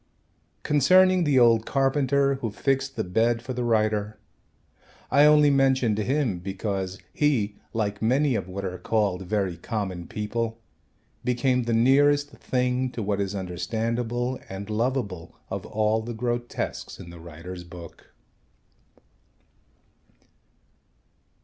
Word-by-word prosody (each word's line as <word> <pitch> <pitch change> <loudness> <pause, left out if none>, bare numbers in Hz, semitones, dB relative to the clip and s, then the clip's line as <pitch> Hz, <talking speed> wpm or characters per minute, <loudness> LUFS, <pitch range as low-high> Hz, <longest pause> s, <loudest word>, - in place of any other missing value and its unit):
Concerning 185 +5 +4
the 145 -3 +3
old 115 -2 +5
carpenter 140 0 +2
who 115 - -1
fixed 135 +5 -1
the - - -1
bed 115 +6 +1
for 130 - -4
the 125 0 -2
writer, 110 -2 +1 0.9
I 145 +1 +6
only 150 -1 +6
mentioned 130 -5 +2
him 125 -4 0
because 95 0 -3 0.2
he, 115 -9 +1
like 105 -2 -2
many 130 +5 +2
of 110 - -2
what 95 +1 -5
are 90 -1 -4
called 95 -2 0
very 95 -4 -1
common 95 -3 -4
people, 115 +2 -3 0.6
became 125 0 +1
the 115 - 0
nearest 145 +5 +4
thing 125 -1 -1
to 115 - -4
what 100 0 -1
is 100 0 -2
understandable 115 +7 -2
and 100 +2 -6
lovable 110 -7 -2 0.2
of - - -4
all 110 +1 +1
the 115 +1 -6
grotesques 120 +1 -3
in 85 - -10
the 85 - -11
writer's 85 +2 -9
book. 85 -1 -12
115 Hz, 125 wpm, -25 LUFS, 100-130 Hz, 0.9 s, I